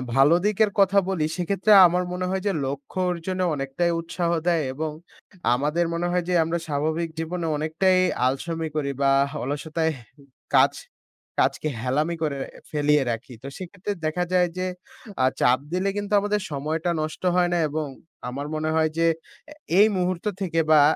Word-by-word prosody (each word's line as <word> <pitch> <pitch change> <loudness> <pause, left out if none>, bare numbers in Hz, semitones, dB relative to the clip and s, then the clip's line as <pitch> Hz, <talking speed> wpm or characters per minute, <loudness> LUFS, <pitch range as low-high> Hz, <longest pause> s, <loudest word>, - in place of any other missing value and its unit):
ভালো 140 +5 +6
দিকের 210 0 +2
কথা 195 0 +4
বলি, 165 -5 0
সেক্ষেত্রে 195 +4 0 0.2
আমার 180 +1 0
মনে 180 0 -2
হয় 190 0 -1
যে, - - +3
লক্ষ্য 140 +6 -5
অর্জনে 185 +2 -3
অনেকটাই 135 +5 -1
উৎসাহ 170 +1 -2 0.2
দেয় 170 -3 +3
এবং 155 +3 -3 0.6
আমাদের 150 +6 +1
মনে 175 +1 -1
হয় 180 0 +1
যে, 180 - +1
আমরা 165 +1 -1
স্বাভাবিক 155 +3 -1
জীবনে 165 +1 -3
অনেকটাই 160 +5 +2 0.3
আলসমি 160 +5 -1
করি, 140 -2 -1
বা 135 0 +4 0.3
অলসতায় 155 +4 -1 0.6
কাজ - - +5 0.7
কাজকে - - +1
হেলামি 150 +7 0
করে 145 -3 -1 0.3
ফেলিয়ে 150 -1 +3
রাখি। 115 +2 -6
তো - - -6
সেক্ষেত্রে 195 +2 -5
দেখা 165 +3 0
যায় 180 -1 +4
যে, 185 - -1 0.6
আ - - +5
চাপ 125 +1 +4
দিলে 185 +2 0
কিন্তু 205 0 -3
আমাদের 205 +1 0
সময়টা 155 +4 -2
নষ্ট 155 +3 -5
হয় 180 -1 +3
না, - - +2
এবং 150 0 -2 0.4
আমার 140 +3 -5
মনে 155 0 -1
হয় 160 0 +3
যে, 165 0 +3 0.4
এ - - -8 0.3
এই 210 - +8
মুহূর্ত 180 0 -1 0.2
থেকে 165 -3 0
বা 150 -2 +7
165 Hz, 165 wpm, -24 LUFS, 150-180 Hz, 0.7 s, এই